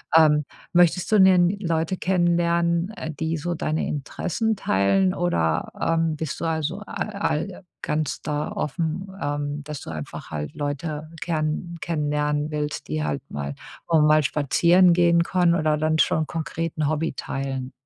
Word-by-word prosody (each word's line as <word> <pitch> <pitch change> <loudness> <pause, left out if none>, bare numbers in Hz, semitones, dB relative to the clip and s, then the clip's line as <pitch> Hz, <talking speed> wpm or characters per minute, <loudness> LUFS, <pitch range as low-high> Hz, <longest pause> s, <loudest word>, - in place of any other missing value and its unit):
Ähm, 150 -2 +5 0.3
möchtest 175 +3 +3
du 215 - +5
denn 185 -2 +6
Leute 165 0 -1
kennenlernen, 170 -1 +1
äh, 160 -6 -6
die 160 +3 -2
so 175 +3 -2
deine 155 0 -1
Interessen 185 - -2
teilen 185 - +2
oder, 80 - 0
ähm, 165 -1 +1
bist 155 -2 -4
du - - -3
also 160 +3 -1
a - - -10 0.2
all 195 -2 -2 0.2
ganz 150 -1 -2
da 150 0 -2
offen, 165 +5 -2
ähm, 145 0 -2
dass 150 -1 -6
du - - -8
einfach 75 -2 -7
halt 75 -1 -4
Leute 150 +1 -4
gern 165 +1 -2
kennenlernen 150 -1 -1
willst, 150 - -3
die 75 0 -1
halt 75 -2 -2
mal 70 -1 -4 0.3
auch 165 -2 +4
mal 155 0 +5
spazieren 170 +6 +4
gehen 170 -1 +4
können 175 -1 +2
oder 155 -2 +1
dann 155 +1 +1
schon 160 -1 +2
konkret 165 0 -3
'n 150 -1 +1
Hobby 155 0 -1
teilen? 135 -1 -4
160 Hz, 155 wpm, -24 LUFS, 150-170 Hz, 0.3 s, denn